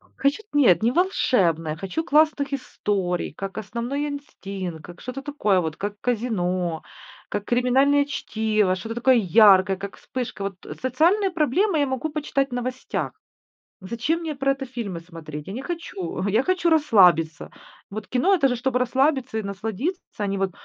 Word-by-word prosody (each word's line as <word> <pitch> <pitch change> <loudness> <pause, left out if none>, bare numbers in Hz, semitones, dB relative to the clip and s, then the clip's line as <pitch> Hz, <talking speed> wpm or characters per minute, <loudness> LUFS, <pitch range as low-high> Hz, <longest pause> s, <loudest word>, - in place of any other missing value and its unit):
Хочу 280 +8 +1
т 425 - -44
нет, 200 - +5
не 235 - +4
волшебное, 185 - +1
хочу 195 - -3
классных 300 -2 +2
историй, 195 - -2
как 195 +3 -6
"Основной 240 +7 -3
инстинкт", 195 - -6
как 175 0 -12
что-то 255 +2 -6
такое 275 -10 +1
вот, 160 -3 -3
как 205 +1 -4
"Казино", 185 -8 -1 0.5
как 205 0 -3
"Криминальное 265 +4 +3
чтиво", 215 -8 0
что-то 225 +4 -6
такое 255 +2 +4
яркое, 195 -2 +5
как 200 +1 -7
вспышка 250 -5 -5
вот. 195 -1 -3 0.3
Социальные 335 - +2
проблемы 340 - +1
я 290 - +3
могу 265 +3 -2
почитать 285 -2 -1
в - - -8
новостях. 250 +1 -3 0.7
Зачем 235 - -1
мне 320 -2 -4
про 275 0 +1
это 270 0 -5
фильмы 230 -8 -5
смотреть? 160 -3 -9
Я 190 - -6
не 250 +6 -5
хочу, 275 - -5
я 215 +5 +3
хочу 365 +1 +1
расслабиться. 180 - +4 0.4
Вот 210 +1 -6
кино- 305 +11 +3
это 280 -7 +3
же 245 - 0
чтобы 250 0 0
расслабиться 265 -1 +1
и - - -2
насладиться, 220 - -3 0.2
а 205 - -1
не 195 0 -1
вот 195 0 0
240 Hz, 165 wpm, -24 LUFS, 195-280 Hz, 0.7 s, нет